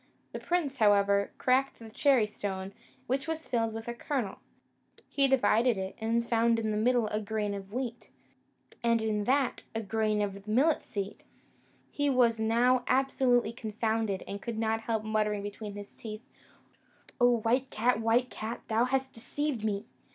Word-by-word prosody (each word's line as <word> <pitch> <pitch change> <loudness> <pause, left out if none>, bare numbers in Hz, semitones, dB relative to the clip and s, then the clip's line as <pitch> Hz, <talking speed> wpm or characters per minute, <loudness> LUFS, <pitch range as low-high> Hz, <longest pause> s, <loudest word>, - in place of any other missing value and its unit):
The - - -5
prince, 320 -6 -1
however, 200 -2 +4
cracked 260 +2 +2
the 225 -1 -11
cherry 265 -1 +3
stone, 195 -2 -5 0.3
which 270 +4 -1
was 320 0 -4
filled 225 -2 0
with 225 +1 -7
a 235 - -2
kernel; 240 -4 -3 0.7
he 275 -1 +2
divided 240 -2 +3
it, 190 0 -4
and 230 +1 0
found 230 0 +3
in 220 -1 -1
the - - -1
middle 240 +2 +2
a 210 +1 -1
grain 210 -1 -2
of 195 -1 -7
wheat, 245 0 -4 0.7
and 230 -1 +3
in 215 -2 -1
that 265 +1 +1
a 225 - -1
grain 215 0 0
of 200 0 -5
millet 270 +9 +3
seed. 200 -1 -5 0.7
He 290 0 0
was 240 -4 +3
now 240 +3 +3
absolutely 255 -3 +2
confounded, 220 -3 -2
and 200 0 -5
could 235 -2 -4
not 225 0 0
help 225 -1 -1
muttering 210 -1 0
between 205 0 -6
his 205 0 -8
teeth, 215 0 -8 1.0
"O 245 -1 +5
white 245 +4 +1
cat, 240 +1 +1
white 235 +3 +2
cat, 220 +2 -5
thou 225 +2 +3
hast 265 +1 -1
deceived 255 +1 -3
me!" 205 -1 -1
225 Hz, 165 wpm, -30 LUFS, 210-250 Hz, 1.0 s, O